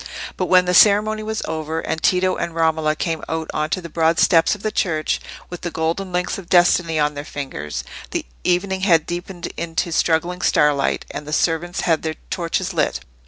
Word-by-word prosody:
But 185 - -2
when 180 -1 +5
the 180 - 0
ceremony 215 +3 +5
was 215 0 -3
over, 160 0 -3
and 160 -1 -3
Tito 185 +1 +2
and 170 - -4
Romola 160 -2 +1
came 160 0 -2
out 160 0 -3
on 155 0 -1
to 185 - -1
the 170 - -7
broad 165 +1 +1
steps 165 +2 +4
of 210 - -14
the 215 - -1
church, 160 -7 0 0.3
with 175 - -7
the 175 - -3
golden 165 +4 -2
links 180 +2 -1
of 180 - -12
destiny 175 -2 +4
on 150 -1 +2
their 145 0 -6
fingers, 130 - -5 0.3
the - - -3 0.2
evening 190 +2 0
had 165 -5 +4
deepened 175 0 -6
into 170 +1 -2
struggling 170 +2 +1
starlight, 150 -4 +2
and 145 0 -7
the - - -6
servants 175 +2 0
had 165 -3 +1
their 160 -1 -3 0.2
torches 180 +2 -2
lit. 165 - 0
170 Hz, 195 wpm, -21 LUFS, 160-180 Hz, 0.3 s, when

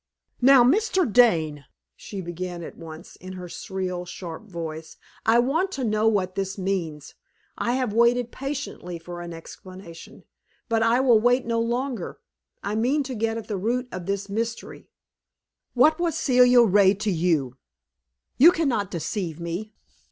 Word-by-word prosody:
"Now 260 0 +7
Mr. 375 - +2
Dane," 165 - +3 0.3
she 200 -2 -7
began 175 0 -6
at - - -9
once, 160 0 -11
in 185 +1 -9
her 180 -1 -8
shrill, 185 -1 -4
sharp 175 +2 -8
voice, 160 -2 -7 0.3
"I 225 +1 +5
want 310 +11 +1
to 265 - -3
know 215 -1 +1
what 190 -4 +1
this 195 +1 -3
means. 175 -6 -3 0.4
I 240 - -1
have 255 -4 -1
waited 235 +1 +3
patiently 270 -10 -5
for 175 +1 -8
an 175 0 -7
explanation, 170 +1 -11 0.4
but 225 -2 +1
I 230 +3 +3
will 245 -4 +5
wait 245 +3 +2
no 230 0 0
longer. 235 -2 -2 0.5
I 205 - -2
mean 255 +7 +1
to 265 -1 -6
get 225 0 -1
at 225 - -7
the 210 - -3
root 245 +6 -1
of 180 -2 -7
this 200 0 -2
mystery. 225 +3 -5 0.9
"What 305 +7 +4
was 335 -2 0
Celia 250 -3 +5
Ray 200 -2 +4
to 210 +1 -2
you? 160 -7 0 0.8
You 325 +7 +9
can 325 -3 0
not 210 -7 -1
deceive 170 0 -4
me. 170 +6 -5
210 Hz, 160 wpm, -24 LUFS, 175-245 Hz, 0.9 s, You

